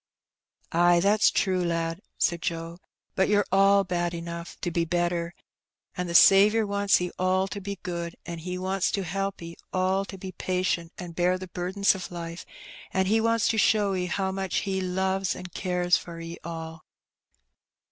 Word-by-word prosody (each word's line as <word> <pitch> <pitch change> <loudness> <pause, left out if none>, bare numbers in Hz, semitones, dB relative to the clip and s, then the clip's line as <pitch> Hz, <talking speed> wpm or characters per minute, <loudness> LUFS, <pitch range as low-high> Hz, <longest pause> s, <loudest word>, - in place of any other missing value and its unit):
''Ay, 175 +1 +4
that's 205 +4 +4
true, 185 -3 +1
lad," 165 +1 -2 0.2
said 170 -2 +1
Joe; 165 +1 -4 0.4
''but 190 - +2
you're 205 0 +3
all 195 +1 +5
bad 175 -2 -2
enough 170 0 -7
to 175 - -2
be 170 0 +1
better, 175 0 -1 0.6
an' 180 0 -3
the 170 - -4
Saviour 210 +5 +7
wants 200 0 +2
'e 180 0 -3
all 185 +1 +2
to 200 - -6
be 200 +1 -5
good, 170 -1 -4
an' 170 -1 -6
He 180 +2 -5
wants 190 0 0
to 200 - 0
help 195 +3 -3
'e 170 0 -8 0.2
all 185 +1 +1
to 195 - -9
be 190 0 -7
patient 180 -3 -1
an' 180 -2 -7
bear 180 +2 +1
the 185 0 -9
burden 185 +3 -5
of 190 -2 -7
life, 170 0 -7 0.4
an' 190 0 +1
He 220 +4 +2
wants 230 0 +2
to 220 - +1
show 210 -2 +3
'e 180 -1 -1
how 190 +1 -1
much 190 -1 -1
He 190 -1 -1
loves 190 +1 0
and 180 - -8
an* 180 - -9
cares 180 -1 +1
for 170 -1 -9
'e 165 0 -7
all." 160 -1 -7
180 Hz, 185 wpm, -26 LUFS, 170-195 Hz, 0.6 s, Saviour